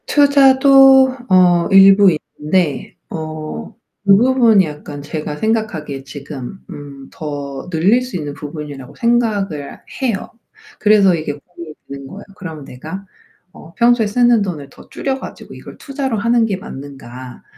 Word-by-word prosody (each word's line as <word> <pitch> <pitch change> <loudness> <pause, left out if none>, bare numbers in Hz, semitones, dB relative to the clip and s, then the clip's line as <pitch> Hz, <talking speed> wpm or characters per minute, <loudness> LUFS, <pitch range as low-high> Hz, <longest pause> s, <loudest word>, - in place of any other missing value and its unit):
투자도 270 -2 +5
어 180 -2 +4
일부 195 +1 +7 0.3
있는데 150 -2 -1
어 155 -1 -6 0.5
그 195 -1 +6
부분이 235 -4 +4
약간 150 -1 -8
제가 150 0 -5
생각하기에 170 -10 -2
지금 140 +2 -8
음, 140 -2 -10
더 145 0 -7
늘릴 185 +9 +2
수 250 -6 -5
있는 145 -3 -5
부분이라고 145 -3 -9
생각을 210 -11 -1 0.2
해요. 235 -7 -2 0.5
그래서 205 -3 +4
이게 155 -3 -3
고민이 165 +1 -12
되는 140 0 -9
거예요. 200 +9 -10
그럼 160 -7 -8
내가 160 +10 -9 0.5
어 165 -2 -15
평소에 235 -2 +3
쓰는 240 +1 +3
돈을 160 -8 -5
더 - - -17
줄여 270 -1 -3
가지고 - - -10
이걸 - - -12
투자로 270 -4 -4
하는 235 +1 +2
게 200 -3 -2
맞는가. 135 - -10
180 Hz, 285 characters per minute, -17 LUFS, 145-230 Hz, 0.5 s, 일부